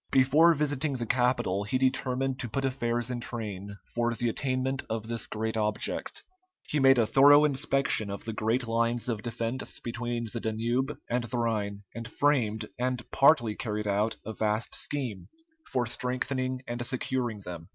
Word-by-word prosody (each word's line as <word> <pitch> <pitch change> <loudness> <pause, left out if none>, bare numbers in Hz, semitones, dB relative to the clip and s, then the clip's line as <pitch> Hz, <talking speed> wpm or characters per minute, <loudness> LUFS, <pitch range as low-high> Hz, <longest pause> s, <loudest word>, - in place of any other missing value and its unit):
Before 150 +6 +5
visiting 145 0 0
the 120 -3 -3
capital 120 -5 +1
he 105 +5 0
determined 130 0 0
to 120 - -3
put 135 +4 -1
affairs 120 -2 -1
in 120 - -2
train 100 -4 -5 0.2
for 120 0 +1
the 120 0 0
attainment 130 +2 -1
of 110 0 -3
this 115 0 -2
great 110 +1 -3
object. 105 -1 -1 0.4
He 150 - -1
made 135 -1 +6
a 115 - +4
thorough 145 +6 +7
inspection 135 -6 +1
of 100 - -6
the 110 - -3
great 115 +3 0
lines 115 +1 +1
of 115 -4 -2
defence 115 +2 -3
between 120 0 -3
the 120 - -2
Danube 120 +6 -1
and 120 0 0
the 120 - -3
Rhine, 105 -3 -1
and 115 +1 -6
framed, 115 -5 +1
and 125 -1 -1
partly 135 -6 +5
carried 105 -1 -3
out, 105 +2 +1
a 110 - -4
vast 110 +1 -1
scheme 130 -9 -3 0.4
for 125 -2 +1
strengthening 130 +1 -1
and 120 0 -3
securing 120 -3 -2
them. 85 -3 -8
120 Hz, 165 wpm, -29 LUFS, 110-130 Hz, 0.4 s, thorough